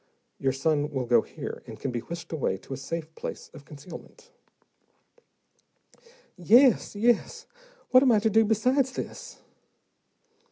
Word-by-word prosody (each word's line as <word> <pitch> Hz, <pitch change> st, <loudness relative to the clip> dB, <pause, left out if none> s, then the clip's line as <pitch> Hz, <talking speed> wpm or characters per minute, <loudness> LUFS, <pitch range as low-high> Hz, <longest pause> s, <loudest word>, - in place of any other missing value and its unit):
Your 135 Hz, -, +1 dB
son 145 Hz, +2 st, 0 dB
will 135 Hz, -4 st, -3 dB
go 120 Hz, 0 st, +4 dB
here, -, -, -8 dB
and -, -, -10 dB
can 135 Hz, -, -3 dB
be 120 Hz, -, -3 dB
whisked 170 Hz, +8 st, -8 dB
away 130 Hz, -11 st, -1 dB
to 135 Hz, -, -9 dB
a -, -, -5 dB
safe 160 Hz, +3 st, -6 dB
place -, -, -7 dB
of 140 Hz, -, -13 dB
concealment." 175 Hz, -, -12 dB, 2.0 s
"Yes, 230 Hz, +7 st, +4 dB
yes. 230 Hz, +2 st, +1 dB, 0.5 s
What 255 Hz, -, +7 dB
am 265 Hz, -2 st, +4 dB
I 220 Hz, -, +5 dB
to 215 Hz, +1 st, +1 dB
do 225 Hz, +2 st, +5 dB
besides 250 Hz, +5 st, +1 dB
this?" -, -, -7 dB
170 Hz, 145 wpm, -27 LUFS, 140-235 Hz, 2.0 s, What